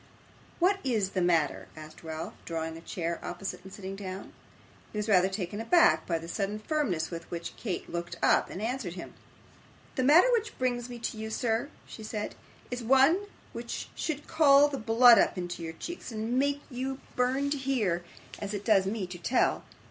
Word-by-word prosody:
'What 385 +3 +3
is 220 -7 0
the 185 - 0
matter?' 165 -4 +1
asked 155 +1 -11
Ralph, 160 -1 -5
drawing 160 -1 -4
a 165 - -9
chair 170 0 -3
opposite, 180 0 -5
and 190 - -11
sitting 195 0 -7
down. 190 -1 -7 0.6
He - - -6
was 210 +1 -1
rather 190 -3 +4
taken 195 +1 -4
aback 230 - +4
by 170 - +1
the 165 +1 -8
sudden 200 +3 -2
firmness 215 - -1
with 170 -1 -7
which 170 -1 -5
Kate 190 -7 -4
looked 170 0 -4
up - - +3
and 195 - -6
answered 230 -7 -3
him. 175 - -8 0.8
'The 260 - 0
matter 305 - +7
which 460 -2 0
brings 245 -1 -1
me 240 - -6
to 230 -1 -4
you, 220 0 -4
sir,' 230 +3 0 0.2
she - - -10
said, 215 -1 -4 0.4
'is 245 0 -3
one 270 - +4 0.3
which 235 0 -5
should 300 -3 -3
call 290 -2 +6
the 275 -2 -4
blood 230 +1 +7
up - - +2
into 175 -1 -4
your 165 -1 -5
cheeks, 345 - -7
and 225 +3 -1
make 285 +1 0
you 260 +2 -3 0.2
burn 265 +3 +1
to 290 - +1
hear, 220 -11 0 0.4
as 205 0 -4
it 205 - -5
does 195 -4 +4
me 205 -1 -2
to 180 0 -8
tell. 240 +9 +1
215 Hz, 190 wpm, -29 LUFS, 180-260 Hz, 0.8 s, matter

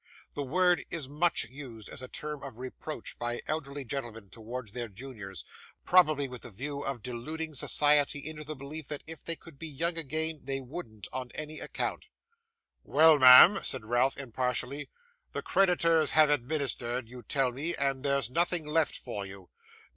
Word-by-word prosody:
This 145 - -3
word 180 +1 +3
is 155 -5 -4
much 155 +5 +1
used 125 -5 -10
as - - -5
a 130 - -7
term 150 +2 -6
of 135 -5 -9
reproach 130 +4 -7
by 120 0 -3
elderly 145 -2 -4
gentlemen 115 -5 -6
towards 115 0 -7
their 120 +1 -4
juniors: 100 - -9 0.4
probably 155 -6 +4
with 125 -2 -9
the 125 - -8
view 140 +7 -5
of 135 -5 -4
deluding 155 +6 -5
society 145 +1 +4
into 155 -1 -6
the 155 +1 -6
belief 140 +2 -7
that 150 -1 -6
if 160 +1 -9
they 165 - -3
could 160 -4 -15
be 165 - -5
young 165 +3 -1
again, 160 +1 -1
they 135 0 -3
wouldn't 120 - -8
on 130 -1 -4
any 155 0 -5
account. - - -4 0.8
'Well, 160 -1 +6
ma'am,' 130 +10 +10
said 130 -5 -2
Ralph, 120 +4 +2
impatiently, 130 +2 -2 0.4
'the - - -4
creditors 165 -4 +3
have 155 -1 +7
administered, 130 -3 -1
you 125 +1 -10
tell 130 +3 +1
me, 150 +7 0
and 135 -1 0
there's 140 -3 0
nothing 170 +1 +1
left 155 +1 +1
for 105 -5 -5
you? 95 -1 -12
140 Hz, 170 wpm, -30 LUFS, 125-155 Hz, 0.8 s, ma'am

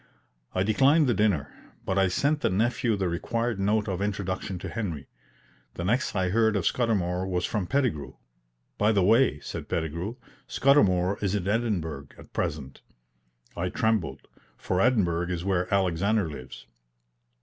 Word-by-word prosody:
I 95 - +2
declined 135 +9 +4
the 125 - +2
dinner, 95 -10 +1 0.3
but 95 +1 0
I 95 - +4
sent 145 +11 +1
the - - +2
nephew 115 +3 +1
the 95 -2 -1
required 115 +6 -2
note 105 +2 +1
of 95 -2 -2
introduction 95 -2 -3
to 90 - -6
Henry. 90 -11 -4 0.7
The 85 - -4
next 120 +5 0
I 95 -1 +1
heard 110 +2 +2
of 100 - 0
Scudamour 95 -6 0
was 90 -1 -1
from 100 -5 -2
Pettigrew. 95 - -1 0.6
"By 105 +2 +3
the 100 -3 +3
way," 110 - +4
said - - -7
Pettigrew, 85 +7 -3 0.3
"Scudamour 100 -9 +3
is 100 0 +1
in 95 -2 -2
Edinburgh 95 -10 -1
at - - -15
present." 70 -3 -3 0.7
I - - -2
trembled, 105 -12 0 0.4
for 90 0 -1
Edinburgh 90 -8 +2
is 90 0 -3
where 90 -2 0
Alexander 100 +1 +1
lives. 70 -4 -9
95 Hz, 150 wpm, -27 LUFS, 90-110 Hz, 0.7 s, declined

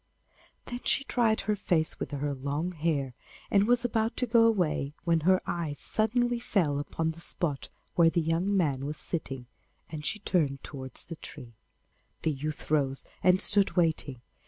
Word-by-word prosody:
Then 245 - -5
she 280 - +2
dried 230 -5 +2
her 210 - 0
face 170 -5 0
with - - -3
her 145 0 -2
long 140 +6 -2
hair, 150 -6 -1 0.4
and 200 +1 +4
was 245 0 +3
about 225 -1 0
to 250 - +1
go 230 -1 +5
away, 155 -9 0
when 165 -1 +3
her 185 +4 +3
eye 165 -4 -2
suddenly 240 +2 +1
fell 170 -11 +1
upon 160 +2 -2
the 165 - -12
spot 155 -4 -1 0.2
where 170 -1 +5
the 170 - +1
young 170 +5 +1
man 140 -6 0
was 150 - -4
sitting, 135 -7 -1 0.5
and 155 -2 -5
she 215 - -2
turned 155 -9 0
towards 130 -3 -6
the 165 - -7
tree. 125 -7 -9 0.7
The 160 - +2
youth 150 +2 -5
rose 135 -3 +1 0.2
and 180 +1 +5
stood 200 -1 +2
waiting. 155 -7 +1
165 Hz, 170 wpm, -29 LUFS, 145-200 Hz, 0.7 s, go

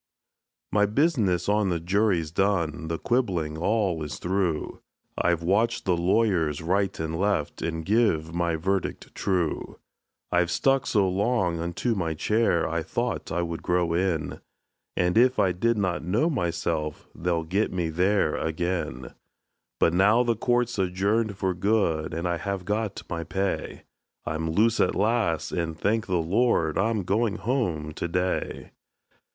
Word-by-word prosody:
My 105 -1 +3
business 105 - +1
on 105 -1 +2
the 85 -2 0
jury's 90 -2 +1
done 85 -4 0
the 80 0 -2
quibblin' 90 -12 0
all 95 -1 0
is 75 -1 -5
through 90 -4 -2 0.3
I've 85 -1 +1
watched 100 +7 +1
the 90 -2 +2
lawyers 85 -4 +1
right 95 +4 0
and 80 +1 -3
left, 100 -7 0
and 80 -1 -3
give 95 -7 +2
my 85 -1 0
verdict 95 +3 -2
true; 90 -5 -1 0.5
I 90 0 +4
stuck 135 +9 +1
so 100 -4 +3
long 95 -2 0
unto 85 +8 -1
my 85 -6 -2
chair, 105 0 +1
I 85 0 -1
thought 80 - -3
I 85 +2 0
would 85 -1 -4
grow 90 -1 +1
in; 85 -4 -1 0.6
And 90 +5 +3
if 130 +1 +4
I 100 -3 +3
do 115 +7 +1
not 95 -5 -1
know 110 - +1
myself, 85 - -2
they'll 85 -1 -1
get 95 +7 0
me 85 -3 -1
there 90 0 +2
ag'in; 80 -6 -3 0.7
But 85 - +3
now 105 +7 +4
the 120 -1 +1
court's 120 0 0
adjourned 100 +3 0
for 95 -2 0
good, 90 -5 +1
and 85 +2 -2
I 85 -1 0
have 95 +1 -4
got 105 0 -2
my 85 -1 -3
pay; 95 +3 -3 0.4
I'm 80 +1 -2
loose 110 +7 +2
at - - +2
last, 105 -5 +1
and 85 -3 -2
thank 110 +1 0
the 95 - 0
Lord, 85 -2 +1
I'm 110 0 +1
going 105 +3 +1
home 95 - -1
to 85 - -3
day. 90 +2 -2
90 Hz, 150 wpm, -26 LUFS, 85-105 Hz, 0.7 s, I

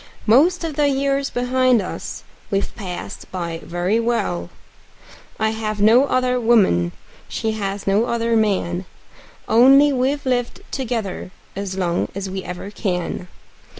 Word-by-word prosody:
Most 320 +11 +4
of 315 -3 -4
the 295 -1 +3
years 275 0 0
behind 250 0 +2
us 190 - -6 0.3
we've 195 0 -1
passed 185 -6 -7
by 170 -3 -4
very 180 +6 0
well; 90 - -1 0.9
I 220 0 +2
have 215 -1 -3
no 225 +6 +6
other 255 -2 +1
woman, 195 - +3 0.4
she 220 - -2
has 200 -2 -3
no 200 +4 +3
other 230 -1 0
man 190 -4 0 0.6
Only 275 +5 +6
we've 270 +3 0
lived 245 -2 -1
together 225 -9 -3 0.3
as 195 -1 -4
long 175 -2 0
as 195 -1 -4
we 190 0 -4
ever 180 +3 -6
can. 180 -3 -3
220 Hz, 135 wpm, -21 LUFS, 190-255 Hz, 0.9 s, no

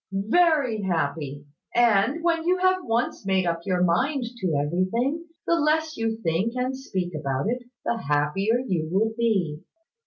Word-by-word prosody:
"Very 250 - +2
happy; 145 -5 -2 0.3
and, 240 +6 +3
when 335 -1 +1
you 365 +1 +3
have 370 0 +3
once 230 0 -1
made 190 -1 +1
up 170 -1 0
your 180 -1 +2
mind 255 - +1
to 185 -8 -1
everything, 185 - 0 0.2
the - - +2
less 310 +1 +1
you 225 -1 -1
think 175 +7 0
and 255 +1 -1
speak 190 -10 -4
about 140 0 -2
it, 245 +2 -1 0.2
the 235 - 0
happier 170 +11 +1
you 165 -8 -1
will 220 +4 +1
be. 195 -10 0
215 Hz, 155 wpm, -25 LUFS, 170-260 Hz, 0.3 s, and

